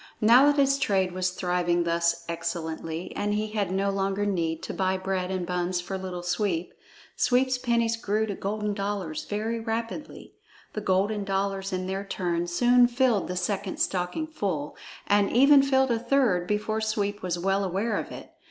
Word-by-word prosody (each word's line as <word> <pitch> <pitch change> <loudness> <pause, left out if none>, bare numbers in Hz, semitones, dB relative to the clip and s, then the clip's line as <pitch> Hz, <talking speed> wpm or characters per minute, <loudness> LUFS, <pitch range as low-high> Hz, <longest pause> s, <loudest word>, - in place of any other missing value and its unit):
Now 240 +6 +6
that 290 0 +3
his 275 0 +3
trade 190 -7 +1
was 185 0 -1
thriving 180 -1 0
thus 170 0 0
excellently 165 0 -4
and 205 0 -1
he 215 +1 -1
had 205 -4 -1
no 195 +1 +1
longer 195 +1 -1
need 165 -5 -1
to - - -5
buy 190 0 0
bread 185 -1 -2
and 185 -2 -2
buns 180 0 -1
for 185 +2 -5
Little 185 -2 -5
Sweep, 180 -1 -1 0.4
Sweep's 255 +1 +2
pennies 235 -2 +1
grew 215 0 0
to 210 - -3
golden 210 +2 -2
dollars 200 -5 -3
very 220 +3 -2
rapidly. 230 +5 -5 0.4
The 215 - -3
golden 200 +2 +1
dollars 195 0 -2
in 185 0 -2
their 190 +1 -3
turn 175 -3 -2
soon 245 +7 +4
filled 240 -4 +1
the 180 - -4
second 200 0 -2
stocking 180 - -1
full, 190 - -3 0.3
and 205 -1 +3
even 275 +3 +7
filled 265 -1 +2
a 230 - +1
third 230 -9 +2
before 215 +2 -1
Sweep 205 -1 -1
was 180 -2 -2
well 195 +3 +1
aware 195 +4 -1
of - - -3
it. - - -10
195 Hz, 175 wpm, -26 LUFS, 180-220 Hz, 0.4 s, even